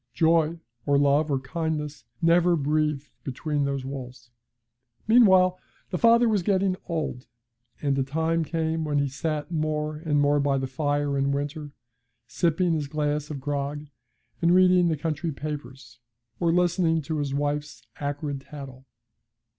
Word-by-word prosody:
Joy, 165 0 +3 0.3
or 140 0 +4
love, 145 +2 +3
or 135 -2 +1
kindness, 150 0 -4 0.2
never 170 +1 +4
breathed 150 -1 0
between 145 +2 -2
those 140 -1 -2
walls. 125 -3 -8 0.8
Meanwhile, 190 -6 +5 0.3
the 180 - -2
father 235 +1 +5
was 210 -4 +2
getting 190 0 +1
old, 155 -7 -3 0.6
and 140 -1 +2
a - - +2
time 160 +4 0
came 160 0 -1
when 150 -2 -1
he 140 0 +2
sat 150 +4 -3
more 155 -1 -1
and 150 -2 0
more 145 0 +3
by 140 -1 +1
the 135 - -1
fire 145 +1 -1
in 140 0 +1
winter, 145 +1 -3 0.5
sipping 170 +7 +1
his 150 -3 -1
glass 150 0 -2
of 145 -3 -5
grog 145 +1 -3 0.6
and 170 +1 +4
reading 180 -1 +5
the 160 -2 0
country 160 +2 -2
papers, 135 -4 -7 0.4
or 170 - +2
listening 175 -2 +2
to 155 +2 -3
his 140 -1 -2
wife's 145 +1 -3
acrid 145 -1 -3
tattle. 135 -2 -10
150 Hz, 145 wpm, -26 LUFS, 140-165 Hz, 0.8 s, Meanwhile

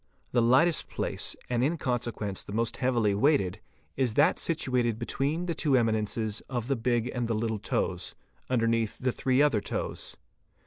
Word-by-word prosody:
—The 120 - +3
lightest 130 +8 +3
place - - -2
and 120 -1 0
in 160 +5 +1
consequence 120 -7 -2
the - - -9
most 115 +1 -1
heavily 120 -5 +2
weighted 105 - +2 0.4
is 125 -5 0
that - - +4
situated 125 -8 0
between 140 +8 -1
the 170 - -1
two 150 -4 +2
eminences 110 -1 0
of 120 -4 -2
the 135 - +1
big 120 0 0
and 120 -2 -1
the 115 - 0
little 110 0 -1
toes, 100 - -2 0.3
underneath 115 -3 +1
the 130 0 0
three 130 +3 +2
other 135 -8 +3
toes. - - -4
120 Hz, 165 wpm, -28 LUFS, 110-130 Hz, 0.4 s, that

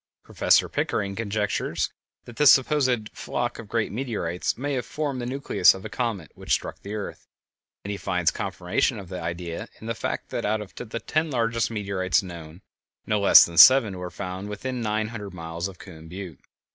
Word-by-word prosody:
Professor - - +3
Pickering 100 -2 -2
conjectures 105 -1 -1 0.3
that 120 - -12
this 150 -2 +7
supposed 130 -5 +2
flock 120 0 -3
of 115 - -9
great 115 0 -1
meteorites 105 -7 -2
may 140 +3 -2
have 125 -2 -1
formed 145 -4 -3
the 120 - -4
nucleus 130 -8 +3
of 95 - -10
a - - -5
comet 115 -10 -3
which - - -2
struck - - -2
the 100 +2 -6
earth, 105 - -6 0.6
and 100 - -3
he 100 - -3
finds 90 -1 +1
confirmation 100 +6 -1
of 95 -4 -9
the 90 -1 -5
idea 85 +5 -5
in - - -11
the 115 - -1
fact - - -4
that - - -2
out 110 +1 0
of 105 -2 -9
the 115 -1 -6
ten 155 +5 -1
largest 115 -4 0
meteorites 100 -6 0
known, 85 -1 -10 0.4
no 105 -1 +1
less 100 - +9
than 85 -1 -1
seven 115 -1 +8
were 90 0 -5
found 95 +1 -6
within 125 +5 -4
nine 110 -1 -1
hundred 105 -5 -7
miles 85 +1 -4
of 95 -2 -11
Coon 80 -4 -12
Butte. 90 -1 -8
105 Hz, 190 wpm, -25 LUFS, 90-120 Hz, 0.6 s, less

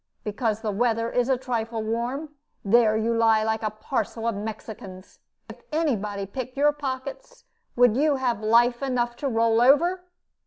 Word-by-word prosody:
Because 220 0 -2
the 215 - -2
weather 230 +2 0
is 245 +1 0
a 260 - +3
trifle 230 -3 -3
warm, 240 +7 -3 0.4
there 220 +1 +4
you 230 +1 0
lie 225 -1 +3
like 220 0 -1
a 215 - -1
parcel 225 +1 -3
of 230 - +1
Mexicans. 205 -2 -8 0.3
If - - -12
any 305 -4 +1
body 200 -1 -4
picked 255 +6 -7
your 295 +1 +4
pockets, 275 - -6 0.3
would 245 -2 +4
you 295 +2 +2
have 245 -5 -1
life 240 +3 +3
enough 245 -3 -1
to 280 - -3
roll 230 -2 +2
over?" 340 +8 +4
235 Hz, 165 wpm, -25 LUFS, 220-260 Hz, 0.4 s, there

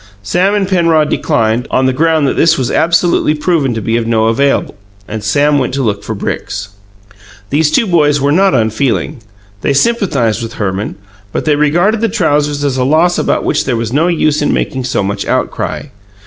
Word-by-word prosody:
Sam 185 - +1
and 200 -2 0
Penrod 165 -5 +2
declined, 120 -4 0
on 130 - +1
the 130 - +1
ground 160 0 +2
that - - -1
this 165 +1 +3
was 130 -3 -1
absolutely 165 -1 +2
proven 150 -6 0
to 110 - -4
be 115 +3 0
of 115 -1 -2
no 110 -1 +1
avail, 140 +5 0 0.3
and 110 0 -6
Sam 145 +7 +2
went 130 0 -2
to 135 - -1
look 105 -3 -2
for 110 +1 -5
bricks. 100 0 -4 0.8
These 150 +2 +2
two 190 - +2
boys 150 -6 +2
were 140 +1 +1
not 190 0 +3
unfeeling. 120 +4 -1 0.4
They 140 - 0
sympathized 140 - +1
with 115 0 -6
Herman; 100 -1 -3 0.4
but - - -3
they 150 -2 +3
regarded 175 +9 +1
the 230 - +1
trousers 150 -8 0
as 135 -2 -1
a 130 - +1
loss 160 +6 +2
about - - 0
which 150 - 0
there 125 -3 -1
was 115 +1 -3
no 155 +5 +2
use 155 -3 +1
in 145 - +1
making 130 -1 -2
so 125 -5 -1
much 100 +1 -3
outcry. - - -2
145 Hz, 195 wpm, -13 LUFS, 115-165 Hz, 0.8 s, this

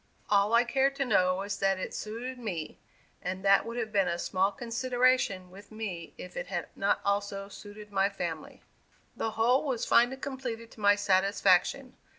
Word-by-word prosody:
All 205 +2 +4
I 235 - +6
cared 270 +3 +1
to 275 0 -1
know 185 -7 +3
was 200 +1 -4
that 195 -1 +2
it 185 - -5
suited 245 +4 -5
me, 180 -10 -5 0.4
and 190 +2 -4
that 195 +3 +5
would 230 +1 -5
have 225 -2 -3
been 195 -3 +2
a 170 0 -1
small 190 +3 +1
consideration 240 -4 0
with 200 +3 -14
me 195 -7 -6
if 180 - -9
it 175 - -4
had 175 -3 -4
not 200 +1 +1
also 200 0 -1
suited 205 +1 -11
my 195 0 +2
family. 170 -6 -6 0.5
The 225 - -2
whole 245 +4 +3
was 260 -6 -2
finally 245 +3 +4
completed 255 -4 -6
to - - -15
my 205 0 +5
satisfaction. 200 +5 +2
205 Hz, 175 wpm, -29 LUFS, 195-240 Hz, 0.5 s, I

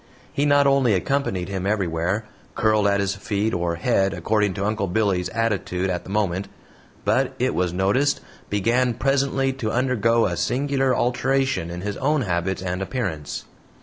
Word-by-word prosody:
He 145 +1 +1
not 145 0 +5
only 135 -6 +4
accompanied 95 -4 -1
him 95 -1 -3
everywhere, 95 0 0 0.3
curled 110 -2 +3
at 100 0 +2
his 100 -1 0
feet 105 +2 -2
or 85 -1 0
head 95 +2 +1
according 105 +2 +1
to 100 - -2
Uncle 105 -2 0
Billy's 95 -2 +1
attitude 100 -5 -1
at 90 - -3
the - - -10
moment, 100 -2 0 0.6
but, - - +1
it - - +1
was 90 -1 0
noticed, 100 +11 +1 0.3
began 115 +4 +1
presently 135 +1 +1
to 125 -5 -3
undergo 115 -2 +2
a 85 - -1
singular 135 - +1
alteration 130 -6 0
in 85 +1 -6
his 100 +1 -4
own 150 +2 +1
habits 95 -2 -1
and 90 0 -2
appearance. 95 - -3
105 Hz, 160 wpm, -23 LUFS, 95-125 Hz, 0.6 s, not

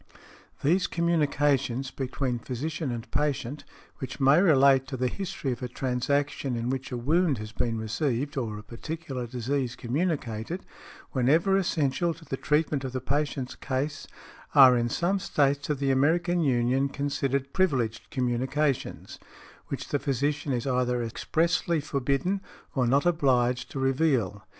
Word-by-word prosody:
These 175 +6 +3
communications 145 -6 +1
between 130 -2 -2
physician 140 +5 -4
and 120 0 -6
patient, 145 -1 -1 0.4
which 130 - -6
may 140 +5 +5
relate 135 -6 +5
to 130 -1 -5
the 125 +1 +1
history 180 -4 -3
of 120 - -5
a 125 - -2
transaction 135 +2 -1
in 120 +2 -1
which 135 0 -4
a 125 - -2
wound 155 +4 +2
has 110 0 -7
been 115 0 -1
received, 120 +5 -1
or 115 -6 -2
a 105 - -9
particular 130 +2 -6
disease 125 +1 -2
communicated, 140 - -2 0.5
whenever 155 +9 +3
essential 170 -2 +1
to 160 +1 -15
the 135 - -3
treatment 150 0 0
of 130 -1 -4
the 130 - -1
patient's 140 0 -2
case, 140 +3 -3 0.5
are 130 -3 +9
in 120 -1 +1
some 185 +9 0
States 145 -4 +1
of 150 - +1
the 135 0 +1
American 170 +6 +2
Union 130 -1 +2
considered 140 -1 -2
privileged 130 - 0
communications, 130 +3 -1 0.5
which - - -5
the 145 - 0
physician 140 +2 -1
is 120 -2 -1
either 125 -2 +1
expressly 165 +7 0
forbidden, 140 +6 -1 0.3
or 130 -3 +1
not 140 +5 +3
obliged, 130 -7 +2
to - - -7
reveal. 135 - +1
135 Hz, 145 wpm, -27 LUFS, 125-150 Hz, 0.5 s, are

